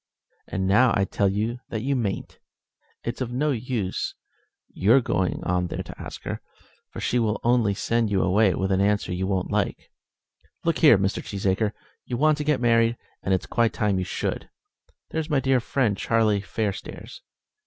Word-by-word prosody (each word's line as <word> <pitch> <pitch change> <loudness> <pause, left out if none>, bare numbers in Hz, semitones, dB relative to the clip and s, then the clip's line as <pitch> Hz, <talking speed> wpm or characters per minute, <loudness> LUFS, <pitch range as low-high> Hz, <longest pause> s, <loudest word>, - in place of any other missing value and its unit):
"And 95 +1 -2
now 115 +6 +4
I 100 - +2
tell 100 0 +1
you 110 +5 -1
that 110 -1 -3
you 140 +1 +1
mayn't. 110 -6 -3 0.6
It's 120 +3 -4
of 125 -2 -2
no 145 +5 +1
use 115 -6 -2 0.5
your 110 +8 +4
going 95 -7 -1
on 90 0 0
there - - -4
to - - -10
ask - - -8
her, - - -4 0.5
for - - -8
she 125 - +1
will 110 -2 0
only 115 -4 +3
send 115 +2 0
you 100 -2 +2
away 95 0 +3
with 95 0 -1
an 95 0 +2
answer 105 -2 +1
you 95 +1 -2
won't 95 -2 -1
like. - - -2 0.7
Look 165 -2 +1
here, 145 -9 +7
Mr. 95 +1 -1
Cheesacre; 100 +1 0 0.3
you 120 - -4
want 155 +2 +3
to - - -1
get 150 -2 +1
married, 115 -1 +3 0.2
and 95 - -2
it's 95 - +1
quite 115 -1 +1
time 105 -3 +1
you - - -1
should. - - -3 0.6
There's 160 0 -2
my 145 -3 +3
dear 135 -1 +2
friend 120 -3 0
Charlie 110 -1 +2
Fairstairs. 105 0 -5
110 Hz, 180 wpm, -25 LUFS, 95-125 Hz, 0.7 s, here